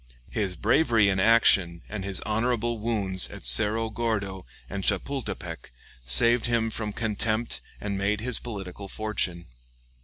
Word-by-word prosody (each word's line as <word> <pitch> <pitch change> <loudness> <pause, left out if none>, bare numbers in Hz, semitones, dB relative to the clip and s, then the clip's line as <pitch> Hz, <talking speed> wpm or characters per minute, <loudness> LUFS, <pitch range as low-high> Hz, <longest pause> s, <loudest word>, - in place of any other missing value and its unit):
His 100 -4 -2
bravery 115 - +2
in 95 -1 0
action 95 -5 +4
and 105 -2 -6
his 95 -1 -2
honorable 115 +1 -1
wounds 100 -5 +3
at - - -11
Cerro 105 - +2
Gordo 105 -5 -3 0.2
and 100 0 -5
Chapultepec 100 - -3 0.4
saved 115 - +6
him 115 -1 0
from 105 -1 -4
contempt 110 +1 -2 0.2
and 100 -1 -4
made 100 +2 0
his 120 +1 +1
political 100 -4 -8
fortune. 95 -5 -3
105 Hz, 130 wpm, -26 LUFS, 95-115 Hz, 0.4 s, saved